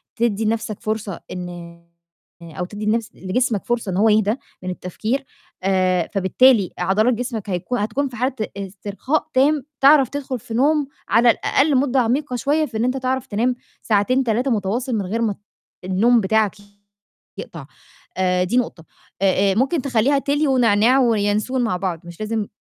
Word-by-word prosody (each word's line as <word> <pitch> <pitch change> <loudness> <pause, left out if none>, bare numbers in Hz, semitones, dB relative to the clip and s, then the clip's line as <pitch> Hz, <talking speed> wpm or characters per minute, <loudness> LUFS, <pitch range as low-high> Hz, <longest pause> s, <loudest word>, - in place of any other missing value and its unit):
تدّي 225 -3 0
نَفْسك 220 -1 -2
فرصة 215 -4 -3
إن 175 -1 -8 0.6
أو 170 +2 -5
تدّي 205 +3 -7
نفس 220 +1 0
لجسمك 215 +3 -1
فرصة 235 -4 -1
إن 180 - -2
هو 220 +3 +4
يهدى 215 0 +3 0.3
من 185 - -3
التفكير، 215 +9 -3 0.4
آآ، 185 -2 +1
فبالتالي 200 +2 +4
عضلات 205 +7 +2
جسمك 230 -3 -4
هيكون 195 +7 -2
هتكون 225 +7 -1
في 250 - -10
حالة 250 +3 -1 0.2
استرخاء 200 - -3
تام، 280 +2 +3 0.2
تعرف 275 -2 +6
تدخُل 270 -3 -4
في 225 - -9
نوم 290 +4 +2 0.2
على 235 +2 +5
الأقل 280 +5 +1
مدة 265 0 +2
عميقة 255 +3 -1
شوية 295 +5 +1
في 230 -6 -6
إن 220 - 0
أنت 255 +1 0
تعرف 260 0 -2
تنام 240 +5 0 0.3
ساعتين، 230 +5 +2
3 245 +4 0
متواصل 230 +4 -1
من 205 -3 -1
غير 220 +5 -2
ما 215 -3 0
ت - - -21 0.5
النوم 225 +6 +3
بتاعك 215 0 +1 0.8
يقطع. - - -8 0.5
آآ، 180 -1 +2
دي 185 +7 0
نقطة. 205 -9 -2 0.4
آآ 195 0 +3
آآ، - - -1
ممكن 270 - +1
تخلّيها 270 +2 +2
تِلي 290 +2 0
ونعناع 245 -1 +4
وينسون 225 +1 +1
مع 225 -6 0
بعض، 180 -3 -3
مش 170 -1 -11
لازم 215 -1 -2
225 Hz, 165 wpm, -21 LUFS, 195-255 Hz, 0.8 s, تعرف